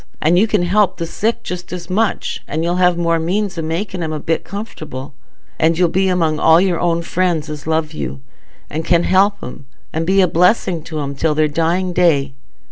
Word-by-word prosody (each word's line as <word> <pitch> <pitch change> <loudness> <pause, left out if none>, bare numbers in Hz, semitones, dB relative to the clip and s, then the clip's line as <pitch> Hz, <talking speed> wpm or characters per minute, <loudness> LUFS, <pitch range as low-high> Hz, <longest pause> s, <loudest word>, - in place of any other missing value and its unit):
And 170 +4 +3
you 220 - +3
can 210 -4 +1
help 190 +1 +2
the 170 - -3
sick 220 +7 -2
just 180 +1 -6
as 175 -1 -6
much, 205 +4 -1
and 160 +3 -2
you'll 175 +1 0
have 180 -1 +3
more 170 -1 +1
means 190 +4 -1
o' - - 0
making 175 +4 -3
'em 160 -2 -2
a 155 - -3
bit 165 +2 -1
comfortable; 155 - -7 0.5
and 160 0 +3
you'll 175 -1 +3
be 190 +3 +1
among 165 -4 +1
all 160 +1 +6
your 180 -2 +1
own 170 -1 0
friends 170 -3 -1
as 150 0 -8
love 160 -1 0
you, 70 -1 -5 0.5
and 160 +2 -4
can 170 +1 +2
help 195 +3 +3
'em 130 +2 -9 0.3
and 165 +1 -2
be 195 +1 +3
a 185 - +5
blessing 180 0 +2
to 155 -2 -5
'em 140 0 -4
till 150 +2 0
their 155 0 +3
dying 170 +4 0
day. 150 -6 +2
170 Hz, 210 wpm, -18 LUFS, 160-185 Hz, 0.5 s, all